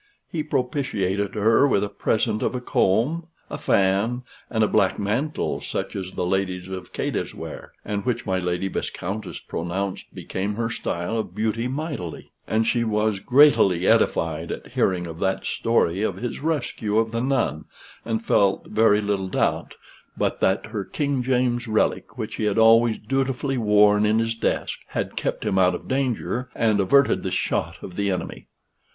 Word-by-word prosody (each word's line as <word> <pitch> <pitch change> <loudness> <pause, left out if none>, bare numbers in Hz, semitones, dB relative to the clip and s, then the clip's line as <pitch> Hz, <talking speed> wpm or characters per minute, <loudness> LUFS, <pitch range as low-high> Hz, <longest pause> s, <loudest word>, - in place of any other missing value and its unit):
He 160 - -1
propitiated 125 -9 -1
her 110 +6 +4
with 100 -7 +2
a - - 0
present 110 +1 0
of - - 0
a - - -1
comb, 125 - +1 0.2
a - - -4
fan, 100 +6 +2 0.3
and 110 -2 +1
a - - +4
black 95 -2 +2
mantle, 115 +10 -1
such - - -4
as 95 -2 -4
the - - -2
ladies 95 0 -1
of 95 -1 -7
Cadiz - - -3
wear, - - -8
and 100 -1 -2
which 120 -2 -1
my 95 -1 0
Lady 90 +1 -1
Viscountess 100 +2 -4
pronounced 95 +3 -4
became 100 +2 -4
her 115 +1 -2
style 85 +2 -2
of 110 - -5
beauty 110 +2 0
mightily. 135 - -5 0.2
And 110 +1 +1
she 120 +1 +1
was 105 -2 0
greatily 110 - +5
edified 85 -7 +2
at - - -6
hearing 90 -2 +1
of 80 -1 -8
that 95 0 -1
story 100 -5 +1
of 110 - 0
his 120 0 -4
rescue 135 -8 -1
of 110 0 +2
the 115 0 -1
nun, 125 - 0 0.4
and 115 0 -2
felt 100 -1 +2
very 110 -1 +4
little 100 -2 -1
doubt - - -1 0.4
but - - 0
that 95 +1 +2
her 110 -2 -4
King 140 - -1
James's 125 -1 +1
relic, 110 -1 0
which - - -5
he 110 - -1
had 105 -2 0
always 115 0 +5
dutifully 135 +2 -1
worn 105 -1 +4
in 110 +1 +3
his 115 0 +1
desk, 115 - -2
had - - -3
kept - - -2
him 95 - +1
out 90 -1 +4
of - - -8
danger, 125 -2 -1
and 110 -3 +2
averted 140 +9 +4
the - - -2
shot - - -1
of 90 - -8
the 100 -1 0
enemy. 90 -2 -4
110 Hz, 170 wpm, -24 LUFS, 95-120 Hz, 0.4 s, greatily